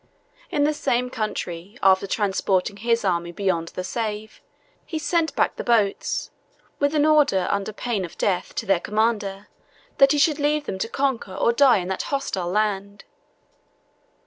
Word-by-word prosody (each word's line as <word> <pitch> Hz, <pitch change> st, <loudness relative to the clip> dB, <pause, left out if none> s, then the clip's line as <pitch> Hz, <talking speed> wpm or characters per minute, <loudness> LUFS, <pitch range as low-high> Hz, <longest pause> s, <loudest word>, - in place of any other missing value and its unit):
In 290 Hz, -, +1 dB
the 300 Hz, +1 st, +2 dB
same 250 Hz, -4 st, -1 dB
country, 200 Hz, -2 st, -4 dB
after 190 Hz, 0 st, +4 dB
transporting 195 Hz, -1 st, 0 dB
his 230 Hz, +1 st, 0 dB
army 170 Hz, -2 st, 0 dB
beyond 175 Hz, -3 st, -1 dB
the 185 Hz, -, -6 dB
Save, 215 Hz, +1 st, -4 dB, 0.4 s
he 320 Hz, -, -5 dB
sent 320 Hz, -1 st, 0 dB
back -, -, +1 dB
the -, -, -4 dB
boats, 220 Hz, -5 st, 0 dB, 0.5 s
with 285 Hz, +1 st, +1 dB
an 300 Hz, 0 st, +3 dB
order 295 Hz, -12 st, +3 dB
under 200 Hz, +1 st, -1 dB
pain 215 Hz, -2 st, -2 dB
of 170 Hz, -, -8 dB
death, 185 Hz, -2 st, -1 dB
to -, -, -3 dB
their 195 Hz, -2 st, +3 dB
commander, 210 Hz, -1 st, -1 dB, 0.5 s
that 275 Hz, 0 st, +7 dB
he 295 Hz, -, +2 dB
should 300 Hz, +1 st, +3 dB
leave 295 Hz, +1 st, +1 dB
him 190 Hz, -, -4 dB
to 225 Hz, -, -2 dB
conquer 260 Hz, -9 st, -1 dB
or 235 Hz, -, +2 dB
die 255 Hz, -5 st, +5 dB
on 175 Hz, -, -6 dB
that 190 Hz, -, -2 dB
hostile 235 Hz, -11 st, -2 dB
land. 200 Hz, 0 st, -1 dB
215 Hz, 165 wpm, -23 LUFS, 190-275 Hz, 0.5 s, that